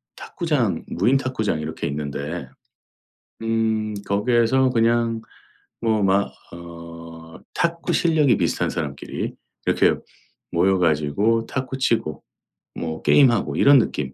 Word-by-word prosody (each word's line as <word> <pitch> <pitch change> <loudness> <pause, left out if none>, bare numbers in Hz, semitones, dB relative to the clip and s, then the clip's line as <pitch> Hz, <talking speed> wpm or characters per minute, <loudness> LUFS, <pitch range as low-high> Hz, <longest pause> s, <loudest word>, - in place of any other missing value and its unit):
탁구장 - - -1
무인 120 +10 +2
탁구장 110 -11 -1
이렇게 80 +1 -5
있는데 70 0 -4 0.9
음 110 -1 0
거기에서 120 +5 +2
그냥 115 -1 +1 0.6
뭐 110 -2 +1
막 100 +1 +2 0.2
어 85 -1 -11 0.2
탁구 170 0 -1
실력이 155 -6 +3
비슷한 85 -4 0
사람끼리 75 -4 -4 0.3
이렇게 - - +3 0.6
모여 95 +3 +3
가지고 90 +8 +1
탁구 130 0 -4
치고 115 -11 0 0.5
뭐 80 -1 -4
게임하고 120 -6 +4
이런 140 -1 +7
느낌 70 - -2
105 Hz, 240 characters per minute, -22 LUFS, 85-120 Hz, 0.9 s, 이런